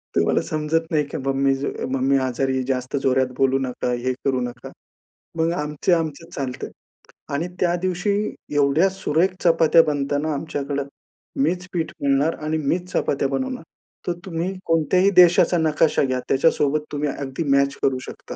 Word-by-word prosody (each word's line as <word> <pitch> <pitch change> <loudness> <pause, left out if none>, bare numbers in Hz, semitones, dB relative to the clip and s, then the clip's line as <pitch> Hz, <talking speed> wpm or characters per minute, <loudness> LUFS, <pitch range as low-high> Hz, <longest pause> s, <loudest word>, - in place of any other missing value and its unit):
"तुम्हाला - - +2
समजत 155 +1 -1
नाही 155 -2 +2
का - - -5
मम्मी 135 0 +2
ज 135 +1 -4 0.3
मम्मी 135 +1 +2
आजारी 130 +1 -1
जास्त 130 +1 -1
जोरात 130 0 +3
बोलू 135 0 +3
नका, 125 -2 -3
हे 125 +1 -1
करू 135 -2 +1
नका." 125 0 -6 0.7
मग 165 +1 +2
आमचं 150 +2 0
आमच्यात 160 0 -5
चालतं 130 -2 -4 0.7
आणि 155 +5 -1
त्या 175 -1 +2
दिवशी 185 +2 0 0.4
एवढ्या 145 +6 +3
सुरेख 185 -2 +1
चपात्या 165 -1 +5
बनता 145 -1 0
ना 155 +2 -1
आमच्याकडं, 140 -1 -3 0.6
मीच 180 +4 -1
पीठ 165 -3 -2
मळणार 140 +3 +2
आणि 155 +1 0
मीच 175 +5 -2
चपात्या 140 -1 0
बनवणार, 255 - -3 0.4
तर 175 - +1
तुम्ही 175 +1 -3
कोणत्याही 165 +4 +3
देशाचा 175 0 +5
नकाशा 160 -1 +2
घ्या 130 -2 0
त्याच्यासोबत 150 +1 +2
तुम्ही 145 0 -1
अगदी 135 +2 -4
मॅच 140 0 +3
करू 130 -1 +2
शकता. - - -9
145 Hz, 155 wpm, -22 LUFS, 135-165 Hz, 0.7 s, चपात्या